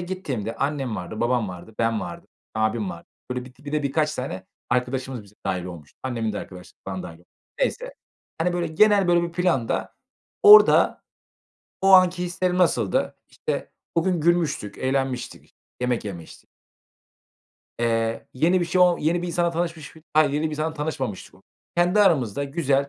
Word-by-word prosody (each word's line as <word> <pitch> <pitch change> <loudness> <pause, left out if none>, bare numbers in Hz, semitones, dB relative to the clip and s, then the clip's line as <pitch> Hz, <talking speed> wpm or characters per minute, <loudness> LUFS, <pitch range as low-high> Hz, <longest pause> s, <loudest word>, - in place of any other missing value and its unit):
gittiğimde 145 - -4
annem 135 -5 -2
vardı, 95 +5 -6
babam 120 -3 +1
vardı, 90 +4 -10
ben 115 -1 +1
vardım, 90 -3 -8 0.3
abim 110 -2 0
vardı. 85 -1 -10 0.2
Böyle 125 0 -3
bir 125 0 -14
di 145 - -22
bir 145 - -6
de 150 -1 0
birkaç 150 +2 0
tane 95 -8 -5 0.2
arkadaşımız 125 -1 -1
bize 100 +1 -19
dâhil 90 -2 -1
olmuştu. 85 -5 -10
Annemin 115 -4 -2
de 105 - -3
arkadaş 90 -1 -10
falan 95 -1 -5
dâhil 85 +1 -11 0.3
Neyse, - - -1 0.4
hani, 175 +2 +1
böyle 175 -1 -1
genel 200 +3 +4
böyle 175 0 +4
bir 170 -1 -3
planda 170 -10 0 0.5
orada 420 +1 +8 0.8
o 195 0 +4
anki 180 -1 +6
hislerim 180 0 -1
nasıldı? 120 - +1
İşte, - - -4 0.2
o 165 - +3
gün 180 -4 +1
gülmüştük, 160 - 0
eğlenmiştik, 130 -1 -3 0.3
yemek 125 -3 0
yemiştik. 85 -5 -9 1.3
Eee, 115 -1 0
yeni 175 +7 +3
bir - - +1
şey 180 +2 0
o 180 -1 +6
yeni 170 +3 0
bir - - -3
insanla 170 0 0
tanışmış 165 -2 -4
mi 160 - -15
Ha, 155 - +7
yeni 145 +2 -1
bir 155 - 0
insanla 155 +1 -2
tanışmamıştık 140 -9 -4
o - - -21 0.3
Kendi 180 +4 +3
aramızda 140 - +2
güzel, 140 -2 0
140 Hz, 165 wpm, -24 LUFS, 115-175 Hz, 1.3 s, orada